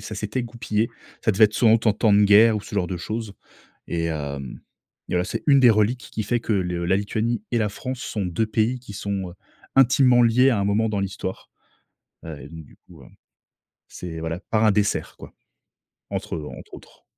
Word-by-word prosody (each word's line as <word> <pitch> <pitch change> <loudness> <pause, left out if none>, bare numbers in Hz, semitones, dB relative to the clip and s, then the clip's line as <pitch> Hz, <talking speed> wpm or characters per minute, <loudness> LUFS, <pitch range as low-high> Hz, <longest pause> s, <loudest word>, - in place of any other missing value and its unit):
ça 110 +1 -7
s'était 110 +5 -3
goupillé. 115 -1 -2 0.3
Ça 110 - +4
devait 110 +2 +5
être 105 - +2
soit 115 - +4
en 115 - +6
tant 110 -2 +2
tant 110 0 +2
de 105 0 +5
guerre 105 +2 +6
ou - - -3
ce 105 - -10
genre 90 -4 0
de 90 - -3
chose, 110 +3 -5 0.5
et 85 -1 -2
hem 70 -5 -5 0.5
et - - -1
voilà. 90 - +2
C'est - - -5
une 140 -2 +6
des 125 - +7
reliques 110 +4 +1
qui 110 - -3
fait 120 +2 0
que 115 - -2
le 90 -3 -1
la 95 +2 +3
Lituanie 110 +2 -2
et 120 - +2
la 105 -1 +1
France 125 +5 -6
sont 105 -6 -3
2 90 +6 -1
pays 115 +3 0
qui 105 -5 -11
sont, 100 -2 -4
heu, - - -14 0.4
intimement 130 -1 +5
liés 125 +4 +4
à 115 - +1
un 100 - 0
moment 105 +2 +1
dans 105 -2 -2
l'histoire, 95 -1 -5 0.7
et 75 -4 -8
donc 80 -2 -10
du - - -20
coup - - -15
heu, - - -15 0.8
c'est 80 -2 -7
voilà, 80 +1 -3
par 110 0 +2
un 110 - +5
dessert 105 0 -1
quoi, - - -12 0.8
entre - - -4
eux. 75 - -5
Entre - - -14
autres. - - -17
105 Hz, 215 wpm, -23 LUFS, 90-115 Hz, 0.8 s, des